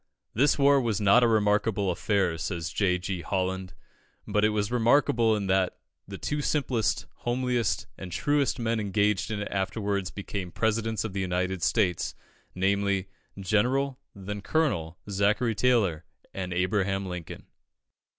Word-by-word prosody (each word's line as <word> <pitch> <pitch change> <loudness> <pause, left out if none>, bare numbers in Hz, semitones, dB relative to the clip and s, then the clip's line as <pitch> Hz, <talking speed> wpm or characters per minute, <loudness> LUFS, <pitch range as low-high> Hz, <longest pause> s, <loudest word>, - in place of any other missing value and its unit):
This 140 +6 +3
war 140 -1 +5
was 115 -4 0
not 105 +4 +5
a - - +5
remarkable 105 -2 +2
affair, 95 -1 0
says 85 -2 -3
J. 90 -3 +1
G. 90 0 -4
Holland, 95 0 -2 0.5
but 105 - +1
it 105 - +5
was 105 0 -1
remarkable 120 -2 +3
that 95 -2 +1 0.3
the 100 0 -7
two 150 +7 -2
simplest, 135 -6 0
homeliest, 120 -4 -1
and 90 -2 -7
truest 145 - +1
men 115 -2 0
engaged 105 0 +1
in 105 -2 -3
it - - -5
afterwards 100 0 -1
became 100 -2 -5
Presidents 110 +1 0
of 110 -4 -5
the 95 - -2
United 95 0 -1
States 90 -2 +1 0.4
namely, 100 0 +1 0.3
General, 125 +8 +1 0.2
then 100 +1 -6
Colonel, 95 - 0
Zachary 105 +4 +1
Taylor 105 -9 +2 0.3
and 95 -1 -4
Abraham 95 +2 0
Lincoln. 90 -3 -7
100 Hz, 140 wpm, -27 LUFS, 95-115 Hz, 0.5 s, war